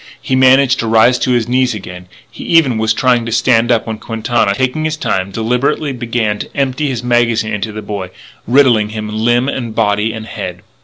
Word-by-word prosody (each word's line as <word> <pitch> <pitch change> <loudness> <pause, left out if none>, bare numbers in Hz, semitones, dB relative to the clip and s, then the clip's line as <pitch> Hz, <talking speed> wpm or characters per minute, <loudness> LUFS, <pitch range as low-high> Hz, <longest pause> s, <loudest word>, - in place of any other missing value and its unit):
He 130 - -2
managed 130 0 +4
to 115 - -2
rise 115 +3 +4
to - - -1
his 120 -2 0
knees 125 -1 +1
again; 90 -3 -9 0.2
he - - -10
even 145 -9 +2
was 110 0 +1
trying 125 +1 +2
to - - -4
stand 120 0 +2
up 115 -2 +1
when 110 -1 -5
Quintana, 115 -2 -1
taking 130 +5 -1
his 155 0 -2
time, 95 -10 -2
deliberately 125 +7 -1
began 115 -3 -2
to - - -6
empty 140 +2 0
his 120 -3 -4
magazine 115 -2 +1
into 105 +1 -3
the 105 0 -7
boy, 100 -3 -5 0.4
riddling 120 -4 +3
him 110 0 -5
limb 120 +3 +1
and 120 -5 -4
body 105 0 +1
and 110 0 -7
head. 100 -6 -7
115 Hz, 200 wpm, -15 LUFS, 110-130 Hz, 0.4 s, managed